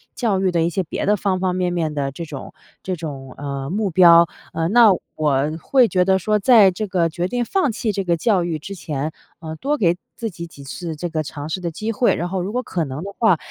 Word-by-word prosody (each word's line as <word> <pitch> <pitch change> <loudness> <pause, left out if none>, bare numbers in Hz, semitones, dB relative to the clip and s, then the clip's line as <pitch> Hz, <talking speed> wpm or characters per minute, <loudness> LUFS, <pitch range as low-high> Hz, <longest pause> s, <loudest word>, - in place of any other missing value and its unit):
教 215 -6 0
育 190 -1 +2
的 170 -2 +1
一 165 - +1
些 185 +3 -1
别 160 - -4
的 210 - +3
方 195 -2 -1
方 180 -1 0
面 180 -1 0
面 165 -3 -1
的 140 -2 -2
这 170 +5 -7
种 145 -4 -8 0.3
这 185 - -2
种， 140 -5 -7
呃， 140 -1 -5
目 205 +3 -1
标。 170 -1 +7 0.3
呃， 165 0 0
那 230 0 +7 0.2
我 150 -3 +1 0.2
会 255 - +4
觉 185 -4 +2
得 190 +1 +3
说， 210 +3 +1
在 210 -3 +6
这 210 +4 -4
个 180 -3 +1
决 175 +2 -2
定 240 +4 -1
放 370 -1 +1
弃 220 0 -2
这 195 -1 -2
个 170 -2 +1
教 190 0 +2
育 170 -2 -2
之 200 +6 -8
前， 150 -3 -4 0.3
呃， 160 -1 -7
多 290 - -1
给 175 -8 +2 0.2
自 230 - -4
己 170 -1 -8
几 140 -4 -13
次 160 +4 -6
这 175 +3 -4
个 160 -1 -1
尝 145 0 -7
试 170 +4 -3
的 170 - -2
机 215 +7 -3
会。 235 +2 +2
然 175 - -2
后 185 +1 -2
如 190 +3 -3
果 250 +3 -2
可 175 -8 -2
能 135 +3 -6
的 200 +1 -7
话， 220 -7 +4
175 Hz, 270 characters per minute, -21 LUFS, 160-200 Hz, 0.3 s, 标